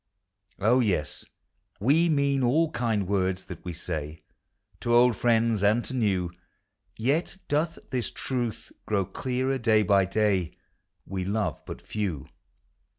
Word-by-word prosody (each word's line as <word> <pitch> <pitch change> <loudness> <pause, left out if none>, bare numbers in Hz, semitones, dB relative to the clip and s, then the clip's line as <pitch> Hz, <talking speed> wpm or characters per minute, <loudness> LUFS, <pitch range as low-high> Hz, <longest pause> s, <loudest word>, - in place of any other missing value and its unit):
On, 115 +6 +3
yes, 90 -10 -1 0.5
we 150 - +3
mean 140 -3 +2
all 150 +6 +2
kind 110 - 0
words 95 -1 0
that - - -10
we 90 - -4
say 80 -2 -5 0.6
To 120 - -2
old 125 +1 +6
f 110 - -9
i - - +5
iends 115 -2 +1
and 105 +4 +3
to - - -4
new; 95 -8 0 0.7
Yet 145 +11 0
doth 155 +3 0
this 125 -3 -1
truth 120 -4 -4 0.2
grow 100 -3 +1
clearer 130 +6 -2
day 110 -2 +4
by 100 0 +4
day: 95 -3 0 0.5
We 95 -1 -3
love 100 +1 -1
but - - -7
few. 95 -10 -3
110 Hz, 145 wpm, -27 LUFS, 95-130 Hz, 0.7 s, old